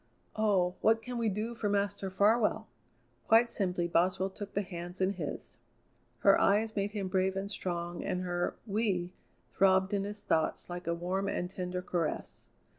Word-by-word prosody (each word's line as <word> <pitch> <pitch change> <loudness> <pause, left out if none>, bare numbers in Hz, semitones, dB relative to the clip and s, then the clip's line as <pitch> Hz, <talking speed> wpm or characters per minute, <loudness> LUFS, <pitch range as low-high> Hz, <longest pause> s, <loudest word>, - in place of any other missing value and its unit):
Oh! 195 -5 +2
what 225 +1 +3
can 245 -1 -4
we 230 -2 +2
do 215 +4 -3
for 225 -3 -2
Master 200 -1 0
Farwell?" 210 +4 +2 0.6
Quite 230 +1 +6
simply 180 -5 0
Boswell 185 +3 +1
took 200 +1 -8
the 200 - +1
hands 175 -1 -6
in 190 +1 +2
his. 165 -7 -6 0.6
Her - - +6
eyes 215 +3 +3
made 200 0 0
him 200 -3 -2
brave 190 0 +1
and 195 +1 -3
strong, 175 -3 -3
and 180 - -1
her 175 -1 -1
"we" 195 -5 0 0.4
throbbed 190 0 +3
in 200 -1 +1
his 205 +1 -6
thoughts 160 +2 0
like 175 0 -6
a 170 - +1
warm 185 +3 -2
and 180 -2 -2
tender 180 -1 -4
caress. 170 -4 -3
190 Hz, 170 wpm, -31 LUFS, 180-205 Hz, 0.6 s, Quite